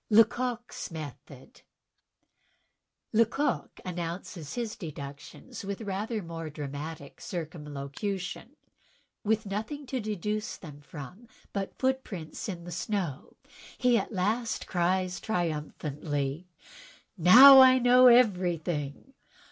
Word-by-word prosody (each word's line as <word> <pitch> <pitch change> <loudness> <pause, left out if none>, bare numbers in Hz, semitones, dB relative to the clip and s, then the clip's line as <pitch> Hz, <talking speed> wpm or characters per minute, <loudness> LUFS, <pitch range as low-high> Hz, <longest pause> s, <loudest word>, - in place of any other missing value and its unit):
Leco(fs 240 +2 +2
Method 145 - -10 1.5
Lecoq 230 +5 +1
announces 170 -3 -5
his 235 -3 -3
deductions 150 - -9
with 200 +2 -5
rather 210 +1 -3
more 165 -1 -6
dramatic 145 0 -7
circumlocution. 170 - -5 0.7
With 220 0 +1
nothing 220 +9 -4
to 260 0 -3
deduce 210 0 -3 0.2
from 150 - -10 0.3
but 195 -1 -4
foot 265 0 0
prints 170 0 -7
in 175 -3 -6
the 175 - -8
snow, 175 - -3 0.4
he 250 -1 +3
at 230 - 0
last 220 +4 -1
cries 180 +1 0
triumphantly: 150 -4 -3 0.7
"Now 250 +10 +10
I 260 0 +8
know 250 0 +6
everything." 180 - +2
185 Hz, 95 wpm, -29 LUFS, 155-230 Hz, 1.5 s, Now